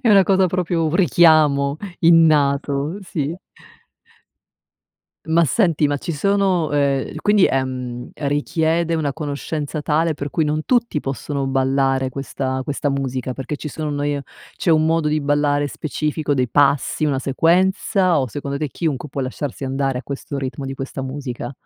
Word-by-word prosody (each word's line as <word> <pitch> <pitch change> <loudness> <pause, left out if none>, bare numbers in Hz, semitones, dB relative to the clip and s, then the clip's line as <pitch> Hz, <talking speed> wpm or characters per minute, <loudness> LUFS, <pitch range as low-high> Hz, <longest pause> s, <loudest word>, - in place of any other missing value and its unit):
È 245 - +1
una 200 -2 +7
cosa 190 -1 +3
proprio 175 -2 -1
un 155 - -2
richiamo 150 -4 +4 0.2
innato, 150 -4 +4
uhm, 145 +8 -2
sì. 165 -3 -4 1.9
Ma 165 +1 +3
senti, 165 - +2
ma 145 - 0
ci 170 - -4
sono, 185 -1 +1
ehm 140 -2 0
quindi, 205 -2 +4
ehm, 125 -2 -3
è 145 - -3
richiede 160 +3 0
una 150 -3 -1
conoscenza 150 0 -4
tale 160 +1 +1
per 145 -1 -5
cui 160 - 0
non 155 +1 -1
tutti 235 -10 +1
possono 140 +1 -3
ballare 135 0 +1
questa 130 0 -3
questa 145 +1 -2
musica, 130 -2 -2
perché 135 +2 -5
ci 150 - -6
sono, 155 +1 -4
noi 145 0 -1
e 140 - -4 0.3
c'è 170 - 0
un 155 0 +4
modo 165 -1 +1
di 155 0 0
ballare 145 0 +1
specifico 150 0 -2
dei 125 -2 0
passi, 140 +2 +2
una 140 -3 +1
sequenza, 180 +4 +2
o 130 - -2
secondo 140 +3 -4
te 150 -2 -2
chiunque 150 0 -3
può 140 - -4
lasciarsi 135 +1 -4
andare 135 -1 -1
a - - -6
questo 140 0 -5
ritmo 135 +1 -4
di 135 0 -4
questa 135 0 -6
musica? 130 -2 -5
145 Hz, 165 wpm, -20 LUFS, 135-160 Hz, 1.9 s, una